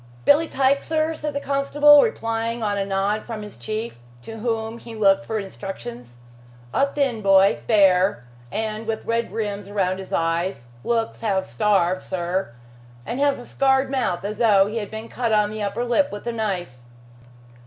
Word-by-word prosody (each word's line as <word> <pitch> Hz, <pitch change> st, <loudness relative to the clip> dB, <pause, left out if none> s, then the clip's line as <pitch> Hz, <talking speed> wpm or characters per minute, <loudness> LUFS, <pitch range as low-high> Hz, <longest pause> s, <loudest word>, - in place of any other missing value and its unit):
"Billy 305 Hz, +3 st, +5 dB
Tyke, 275 Hz, 0 st, +2 dB
sir?" 315 Hz, 0 st, 0 dB
said 300 Hz, -2 st, -5 dB
the -, -, 0 dB
constable, 285 Hz, +1 st, +5 dB
replying 230 Hz, 0 st, -1 dB
on 205 Hz, -1 st, 0 dB
a 200 Hz, -, 0 dB
nod 200 Hz, +2 st, 0 dB
from 220 Hz, -3 st, -6 dB
his 210 Hz, -, -10 dB
chief, 215 Hz, -, -5 dB, 0.2 s
to 225 Hz, 0 st, -8 dB
whom 225 Hz, 0 st, -2 dB
he 230 Hz, -1 st, -10 dB
looked 195 Hz, -2 st, +3 dB
for 220 Hz, -, -2 dB
instructions, 125 Hz, -, -7 dB, 0.6 s
"a 275 Hz, -, +3 dB
thin 275 Hz, -5 st, -1 dB
boy, 195 Hz, 0 st, +5 dB
fair 195 Hz, -, +4 dB, 0.3 s
and 220 Hz, +1 st, -3 dB
with 225 Hz, -1 st, -3 dB
red 230 Hz, 0 st, -1 dB
rims 205 Hz, -3 st, -4 dB
round 190 Hz, -2 st, 0 dB
his 190 Hz, -, -9 dB
eyes 165 Hz, -4 st, -1 dB, 0.2 s
looks 230 Hz, -1 st, -1 dB
half 195 Hz, -4 st, 0 dB
starved, 185 Hz, -, +1 dB
sir, 180 Hz, -3 st, -2 dB, 0.5 s
and 245 Hz, -, -4 dB
has 285 Hz, -1 st, +2 dB
a 245 Hz, -, -10 dB
scarred 265 Hz, 0 st, +1 dB
mouth, 235 Hz, -9 st, -1 dB
as 210 Hz, +1 st, -4 dB
though 205 Hz, -5 st, +5 dB
he 215 Hz, +3 st, -4 dB
had 210 Hz, -3 st, -4 dB
been 220 Hz, +1 st, -7 dB
cut 235 Hz, -1 st, -2 dB
on 210 Hz, -1 st, +2 dB
the 215 Hz, 0 st, -5 dB
upper 205 Hz, +4 st, -2 dB
lip 280 Hz, +4 st, +2 dB
with 205 Hz, +2 st, -7 dB
a 240 Hz, -, -1 dB
knife." 185 Hz, -, -3 dB
215 Hz, 175 wpm, -23 LUFS, 195-240 Hz, 0.6 s, Billy